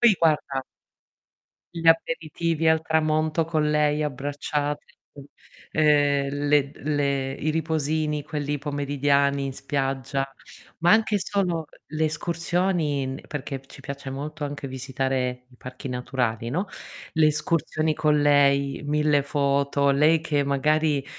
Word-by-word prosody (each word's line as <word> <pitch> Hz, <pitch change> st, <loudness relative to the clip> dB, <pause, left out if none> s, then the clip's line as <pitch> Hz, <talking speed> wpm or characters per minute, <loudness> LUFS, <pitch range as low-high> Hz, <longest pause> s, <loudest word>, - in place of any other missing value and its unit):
Poi 235 Hz, -4 st, +6 dB
guarda 145 Hz, -4 st, +1 dB, 1.1 s
gli 165 Hz, -1 st, -4 dB
aperitivi 165 Hz, -2 st, +2 dB
al 160 Hz, 0 st, +4 dB
tramonto 155 Hz, 0 st, +1 dB
con 155 Hz, -2 st, 0 dB
lei 150 Hz, 0 st, +2 dB
abbracciate, 145 Hz, +1 st, -2 dB, 0.9 s
ehm, 145 Hz, -2 st, +3 dB, 0.2 s
le 145 Hz, -1 st, +3 dB
le 140 Hz, -2 st, -1 dB
i 155 Hz, -, -2 dB
riposini 155 Hz, -1 st, -1 dB
quelli 145 Hz, 0 st, -3 dB
pomeridiani 140 Hz, -1 st, +1 dB
in 135 Hz, -, -3 dB
spiaggia, 135 Hz, 0 st, -2 dB, 0.5 s
ma 175 Hz, +3 st, +4 dB
anche 215 Hz, -1 st, +3 dB
solo 185 Hz, -5 st, -1 dB, 0.2 s
le 155 Hz, +1 st, -1 dB
escursioni 165 Hz, -2 st, 0 dB
n 130 Hz, 0 st, -5 dB
perché 135 Hz, -2 st, -5 dB
ci -, -, -13 dB
piace 140 Hz, -1 st, -7 dB
molto 150 Hz, +3 st, -5 dB
anche 145 Hz, -1 st, -5 dB
visitare 130 Hz, -1 st, -2 dB
i 125 Hz, -, -20 dB
parchi 130 Hz, +1 st, -8 dB
naturali, 125 Hz, -2 st, -2 dB
no. 180 Hz, +10 st, -1 dB, 0.5 s
Le 160 Hz, -2 st, +4 dB
escursioni 155 Hz, 0 st, 0 dB
con 150 Hz, -1 st, +2 dB
lei, 140 Hz, -1 st, +3 dB
1000 150 Hz, 0 st, +2 dB
foto, 140 Hz, 0 st, +1 dB
lei 150 Hz, +4 st, +4 dB
che 150 Hz, -3 st, 0 dB
magari, 150 Hz, +1 st, +1 dB
145 Hz, 120 wpm, -25 LUFS, 140-155 Hz, 1.1 s, Poi